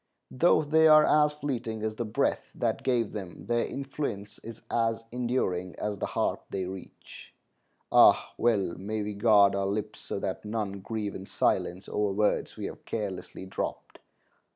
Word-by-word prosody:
Though 155 Hz, +3 st, +4 dB
they 160 Hz, +2 st, +5 dB
are 155 Hz, 0 st, +8 dB
as 150 Hz, 0 st, +4 dB
fleeting 120 Hz, -7 st, -4 dB
as 110 Hz, 0 st, -1 dB
the 120 Hz, -, -3 dB
breath 110 Hz, -, -1 dB
that -, -, -1 dB
gave 120 Hz, -4 st, +1 dB
them, 95 Hz, -5 st, -7 dB
their 120 Hz, 0 st, +1 dB
influence 135 Hz, -7 st, -5 dB
is 115 Hz, -1 st, -10 dB
as 115 Hz, -1 st, 0 dB
enduring 120 Hz, -8 st, -1 dB
as 105 Hz, -2 st, -3 dB
the -, -, -1 dB
heart -, -, -1 dB
they 95 Hz, -1 st, -3 dB
reach. 95 Hz, 0 st, -10 dB, 0.6 s
Ah, -, -, +6 dB
well 105 Hz, -7 st, +1 dB
may 105 Hz, +2 st, -3 dB
we 105 Hz, 0 st, -4 dB
guard 100 Hz, -1 st, +5 dB
our 100 Hz, 0 st, 0 dB
lips 105 Hz, +2 st, -3 dB
so -, -, -5 dB
that 95 Hz, -1 st, -3 dB
none 105 Hz, -2 st, -3 dB
grieve 105 Hz, 0 st, -4 dB
in 95 Hz, -, -8 dB
silence 90 Hz, +2 st, 0 dB
over 105 Hz, -1 st, 0 dB
words 105 Hz, +1 st, 0 dB
we -, -, -4 dB
have -, -, -7 dB
carelessly 100 Hz, -3 st, -5 dB
dropped. 95 Hz, -, -5 dB
110 Hz, 165 wpm, -28 LUFS, 100-120 Hz, 0.6 s, are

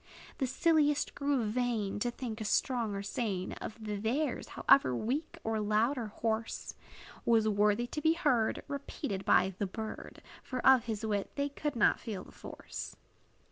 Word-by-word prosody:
The 265 Hz, -, +1 dB
silliest 295 Hz, +1 st, +2 dB
grew 280 Hz, -3 st, 0 dB
vain, 220 Hz, -3 st, -1 dB
To 240 Hz, -, 0 dB
think 235 Hz, -2 st, -5 dB
a -, -, -1 dB
song 230 Hz, -1 st, +1 dB
or 200 Hz, -, -3 dB
strain 200 Hz, -3 st, -2 dB
Of -, -, -5 dB
theirs, 220 Hz, +7 st, -1 dB
however 130 Hz, -, +5 dB
weak, 265 Hz, -, -2 dB
or 220 Hz, -1 st, 0 dB
loud, 215 Hz, +5 st, +2 dB
or 235 Hz, -4 st, -3 dB
hoarse, 220 Hz, +1 st, -3 dB, 0.5 s
Was 225 Hz, -2 st, +4 dB
worthy 210 Hz, +2 st, +3 dB
to 300 Hz, +5 st, -5 dB
be 320 Hz, +1 st, +4 dB
heard 255 Hz, -10 st, +1 dB
Repeated 280 Hz, -7 st, -4 dB
by 190 Hz, +1 st, +4 dB
the 200 Hz, -, 0 dB
bird; 220 Hz, +3 st, -7 dB, 0.2 s
For 255 Hz, -, -4 dB
of 260 Hz, -3 st, +7 dB
his 220 Hz, -1 st, -3 dB
wit 205 Hz, -2 st, -1 dB
they 280 Hz, 0 st, 0 dB
could 290 Hz, 0 st, -3 dB
not 220 Hz, -, +4 dB
feel 210 Hz, -6 st, -5 dB
the -, -, -15 dB
force. -, -, -8 dB
225 Hz, 165 wpm, -32 LUFS, 210-265 Hz, 0.5 s, of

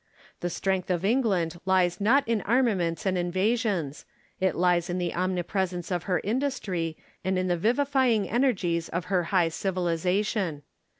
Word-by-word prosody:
The 175 Hz, -, -2 dB
strength 190 Hz, +1 st, -1 dB
of 180 Hz, 0 st, 0 dB
England 195 Hz, -8 st, +1 dB
lies 185 Hz, -1 st, +2 dB
not 270 Hz, +7 st, +3 dB
in 225 Hz, -2 st, +1 dB
armaments 210 Hz, -7 st, +1 dB
and 185 Hz, -2 st, +1 dB
invasions: 185 Hz, -, 0 dB, 0.4 s
it 190 Hz, 0 st, +1 dB
lies 175 Hz, 0 st, +2 dB
in 175 Hz, -, -1 dB
the 175 Hz, -1 st, -2 dB
omnipresence 180 Hz, 0 st, -2 dB
of 175 Hz, -2 st, -1 dB
her 180 Hz, -2 st, +1 dB
industry, 205 Hz, -, -2 dB, 0.3 s
and 190 Hz, 0 st, 0 dB
in 185 Hz, 0 st, 0 dB
the 175 Hz, -, +2 dB
vivifying 245 Hz, -, +2 dB
energies 185 Hz, -9 st, 0 dB
of 170 Hz, +1 st, -3 dB
her 180 Hz, -2 st, +2 dB
high 175 Hz, -2 st, +2 dB
civilisation. 180 Hz, -1 st, -1 dB
185 Hz, 145 wpm, -27 LUFS, 175-215 Hz, 0.4 s, not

